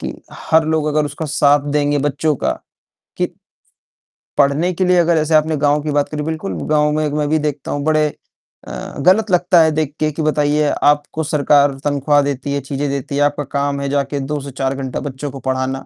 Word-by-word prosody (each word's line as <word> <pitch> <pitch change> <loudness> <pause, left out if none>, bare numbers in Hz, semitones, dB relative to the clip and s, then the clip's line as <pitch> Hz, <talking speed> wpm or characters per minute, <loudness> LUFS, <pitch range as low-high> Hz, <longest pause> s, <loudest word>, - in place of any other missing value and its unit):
कि - - -4 0.4
हर 160 0 +5
लोग 160 -1 0
अगर 150 0 +1
उसका 155 +2 -5
साथ 145 0 +2
देंगे 145 0 +1
बच्चों 145 +2 0
का 65 - -1 0.7
कि - - +1 1.1
पढ़ने 145 +5 +2
के 185 +2 0
लिए 180 0 +3
अगर 170 -1 +3
जैसे 155 0 0
आपने 155 +1 +3
गाँव 145 +1 +2
की 150 - -2
बात 145 0 0
करी, 150 -1 -4
बिल्कुल 160 +5 -4 0.2
गाँव 150 -1 +3
में 155 0 0
मैं 150 0 -1
भी 155 +1 +2
देखता 150 -2 -3
हूँ 145 - -2
बड़े 155 -1 +3 0.6
अ, - - -7 0.3
गलत 190 +7 +3
लगता 180 -1 +4
है 160 0 +4
देख 155 -2 -2
के 155 0 +1
कि 150 - -5
बताइए 150 -1 +1 0.2
आपको 145 +2 +1
सरकार 145 -2 +3
तनख्वाह 145 0 +2
देती 140 0 -3
है, 140 - -1
चीज़ें 140 +2 -3
देती 140 0 -4
है, 145 - +1
आपका 145 0 +1
काम 140 0 -2
है 140 - -2
जाके 140 0 -1
2 145 +2 -3
से 140 0 -8
4 135 0 -2
घंटा 135 -1 -4
बच्चों 140 0 -5
को 135 - -8
पढ़ाना 130 0 -2
145 Hz, 210 wpm, -18 LUFS, 140-155 Hz, 1.1 s, हर